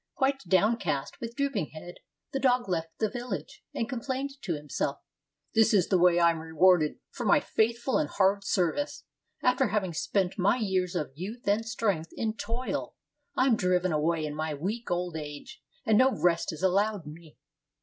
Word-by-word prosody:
Quite 270 0 +1
downcast, 185 -7 +1
with 235 0 -5
drooping 275 - -1
head, 175 +3 -9 0.3
the 270 - -1
dog 250 -3 +2
left 165 -3 -3
the 220 - +1
village, 240 -3 -6
and 230 - -2
complained 265 +2 -3
to 170 - -2
himself: 145 -1 -3 0.6
"This 225 0 +4
is 185 -4 +3
the 185 - +3
way 175 0 +5
I 170 -1 +6
am 165 - -4
rewarded 160 0 +3
for - - -5
my - - +5
faithful 235 +3 +1
and 150 - -1
hard 200 +1 +2
serv 180 -4 +1
ice; 290 - -4 0.4
after 250 +1 +3
having 200 -5 -1
spent 185 +4 -1
my 195 +6 +3
years 190 -5 0
of 150 -6 -2
youth 200 - -7
and 205 +3 +2
strength 200 -9 -1
in 220 -1 -2
toil, 235 +3 -3 0.4
I 260 - +4
am 255 -4 +4
driven 180 -2 +1
away 155 +1 +1
in 150 - -4
my 155 0 -3
weak 210 +11 -4
old 175 -1 -1
age, 150 - -7 0.2
and 215 -1 +4
no 260 +1 +5
rest 175 -7 +1
is 160 +2 -8
allowed 200 0 +2
me." 155 +1 -12
190 Hz, 180 wpm, -28 LUFS, 165-230 Hz, 0.6 s, I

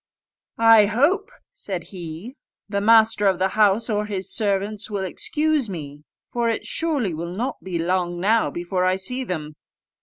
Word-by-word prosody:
"I 225 -2 +6
hope," 325 - +1 0.2
said 195 - -6
he, 175 - -8 0.3
"the 200 -1 -2
master 220 -1 +4
of 190 -2 +2
the 190 +1 +1
house 210 +1 +3
or 210 -2 -1
his 195 -2 -2
servants 205 -1 -1
will 200 -2 -3
excuse 300 - 0
me, 145 -5 -7 0.3
for 235 -1 0
it 225 - -2
surely 285 - -1
will 170 +3 -5
not 245 +6 -3
be 185 -2 -3
long 175 +1 -1
now 220 +5 +2
before 175 +1 -2
I 185 0 +2
see 250 +8 -1
them." 155 -9 -5
205 Hz, 160 wpm, -22 LUFS, 180-230 Hz, 0.3 s, I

